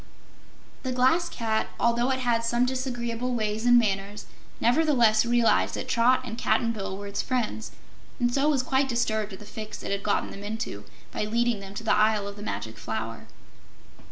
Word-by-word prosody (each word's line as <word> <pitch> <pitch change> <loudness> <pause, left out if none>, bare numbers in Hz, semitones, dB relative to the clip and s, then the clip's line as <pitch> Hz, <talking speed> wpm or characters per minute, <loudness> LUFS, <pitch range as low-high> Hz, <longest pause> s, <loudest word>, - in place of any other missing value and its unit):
The 260 - -3
Glass 260 +8 +3
Cat, 220 -1 -1
although 235 +2 +2
it 260 0 0
had 235 -2 +1
some 240 +1 +2
disagreeable 250 -1 -2
ways 215 +1 -1
and 245 0 +7
manners, 205 -2 0 0.3
nevertheless 240 -5 +4
realized 240 -1 +3
that - - -5
Trot 240 +2 +3
and 230 -1 -6
Cap'n 230 -2 +2
Bill 195 -3 -4
were 205 - -7
its 200 0 -2
friends 215 - -2 0.5
and 240 0 +1
so 280 +3 +3
was 275 -4 +2
quite 265 +1 +1
disturbed 220 -4 0
at - - -7
the 210 - -12
fix 215 +1 -8
it - - -4
had 200 0 -1
gotten 205 - 0
them 200 - -9
into 205 - -5 0.3
by - - -2
leading 235 0 +1
them 195 0 -10
to 230 - -5
the 225 - +3
Isle 215 -1 +3
of 200 - -7
the 205 - -10
Magic 115 - -5
Flower. 110 +1 -5
230 Hz, 185 wpm, -26 LUFS, 210-245 Hz, 0.5 s, and